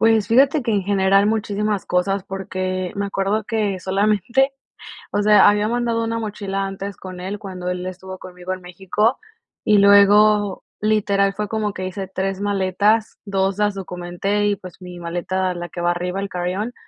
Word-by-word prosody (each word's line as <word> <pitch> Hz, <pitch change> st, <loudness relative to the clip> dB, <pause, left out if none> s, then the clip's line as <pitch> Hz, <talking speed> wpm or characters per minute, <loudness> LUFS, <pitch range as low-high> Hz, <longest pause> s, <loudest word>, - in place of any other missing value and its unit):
Pues 225 Hz, -2 st, +4 dB
fíjate 270 Hz, +5 st, +4 dB
que 235 Hz, -2 st, -1 dB
en 200 Hz, -2 st, +1 dB
general 195 Hz, 0 st, +3 dB
muchísimas 210 Hz, -2 st, -1 dB
cosas 190 Hz, +2 st, 0 dB
porque, 185 Hz, -1 st, -3 dB
me 200 Hz, 0 st, -1 dB
acuerdo 200 Hz, +2 st, -1 dB
que 210 Hz, -4 st, -1 dB
solamente, 210 Hz, +8 st, +1 dB, 0.6 s
o 205 Hz, -, +1 dB
sea, 210 Hz, 0 st, +6 dB
había 205 Hz, +1 st, +1 dB
mandado 235 Hz, -1 st, 0 dB
una 230 Hz, 0 st, -2 dB
mochila 200 Hz, -3 st, -3 dB
antes 195 Hz, 0 st, -6 dB
con 185 Hz, -1 st, -9 dB
él 195 Hz, +3 st, -5 dB
cuando 185 Hz, -3 st, -6 dB
él 180 Hz, 0 st, -3 dB
estuvo 185 Hz, 0 st, -7 dB
conmigo 180 Hz, 0 st, -8 dB
en 185 Hz, -, -8 dB
México, 190 Hz, +6 st, 0 dB, 0.5 s
y 210 Hz, -, +4 dB
luego, 205 Hz, 0 st, +5 dB, 0.2 s
literal, 200 Hz, -2 st, +2 dB
fue 210 Hz, +1 st, -3 dB
como 210 Hz, -1 st, -2 dB
que 185 Hz, -, -5 dB
hice 190 Hz, +1 st, -5 dB
3 195 Hz, +1 st, -2 dB
maletas, 205 Hz, +2 st, +1 dB
2 195 Hz, -1 st, 0 dB
las 210 Hz, -1 st, +1 dB
documenté, 190 Hz, +2 st, -2 dB
y 205 Hz, -, +2 dB
pues, 185 Hz, 0 st, -12 dB
mi 180 Hz, -1 st, -9 dB
maleta, 180 Hz, +2 st, -2 dB
la 175 Hz, 0 st, -6 dB
que -, -, -8 dB
va 175 Hz, 0 st, +2 dB
arriba, 180 Hz, +2 st, -3 dB
el 200 Hz, -, -2 dB
carry-on, 185 Hz, +6 st, -3 dB
195 Hz, 175 wpm, -21 LUFS, 185-210 Hz, 0.6 s, sea